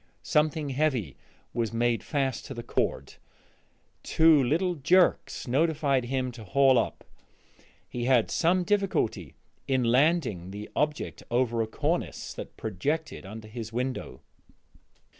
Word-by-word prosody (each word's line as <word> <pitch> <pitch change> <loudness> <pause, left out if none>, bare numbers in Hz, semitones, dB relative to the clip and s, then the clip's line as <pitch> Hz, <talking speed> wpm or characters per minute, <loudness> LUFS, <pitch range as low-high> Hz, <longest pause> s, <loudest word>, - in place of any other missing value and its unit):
Something 150 -1 +1
heavy 130 - 0 0.4
was 115 -2 -1
made 120 0 +1
fast 135 -5 -2
to 135 - -7
the 120 - -6
cord; - - -2 0.9
two 160 -3 +5
little 170 +8 +1
jerks 175 0 +2
notified 140 -1 +1
him 130 0 -1
to 115 -2 -10
haul 135 +3 +4
up. - - -3 0.8
He 120 -1 -4
had 125 -3 +3
some 180 +2 +2
difficulty 185 - 0 0.3
in 130 -2 +2
landing 125 - +2
the 105 +2 -8
object 150 0 -1
over 120 -1 +1
a 110 - -1
cornice - - -2
that - - -9
projected 135 - -3
under 110 +2 -9
his 110 0 -7
window. 125 +2 -4
130 Hz, 125 wpm, -28 LUFS, 115-150 Hz, 0.9 s, two